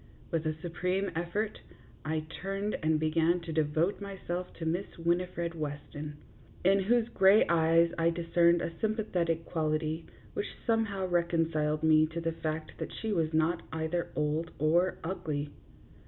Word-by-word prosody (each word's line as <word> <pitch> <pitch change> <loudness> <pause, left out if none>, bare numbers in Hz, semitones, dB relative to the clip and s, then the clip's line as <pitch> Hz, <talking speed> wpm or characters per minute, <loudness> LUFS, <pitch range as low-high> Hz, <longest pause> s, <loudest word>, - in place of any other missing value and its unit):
With 160 -1 0
a 155 - -1
supreme 180 +3 -1
effort 190 +6 -2 0.4
I 155 0 -1 0.2
turned 195 +2 -2
and 155 -1 +2
began 160 +2 +2
to 165 -1 -5
devote 155 +6 +1
my 200 -1 -6
self 175 +1 -3
to 165 - -6
Miss 175 +5 -2
Winifred 170 0 0
Weston, 150 -1 -5 0.5
in 195 +1 +5
whose 225 +4 +2
gray 195 +1 +6
eyes 165 0 +4
I 165 0 +4
discerned 170 0 +3
a - - -2
sympathetic 180 -7 0
quality 155 0 -1 0.3
which - - -4
somehow 225 -5 +1
reconciled 165 -3 +1
me 155 0 +5
to 160 +2 -5
the 165 0 -1
fact 155 -1 -4
that - - -4
she 220 -1 -3
was 160 -4 +1
not 160 +2 +2
either 160 +2 -2
old 155 +2 0
or 170 +5 +2
ugly. 155 -5 -3
165 Hz, 150 wpm, -31 LUFS, 155-180 Hz, 0.5 s, gray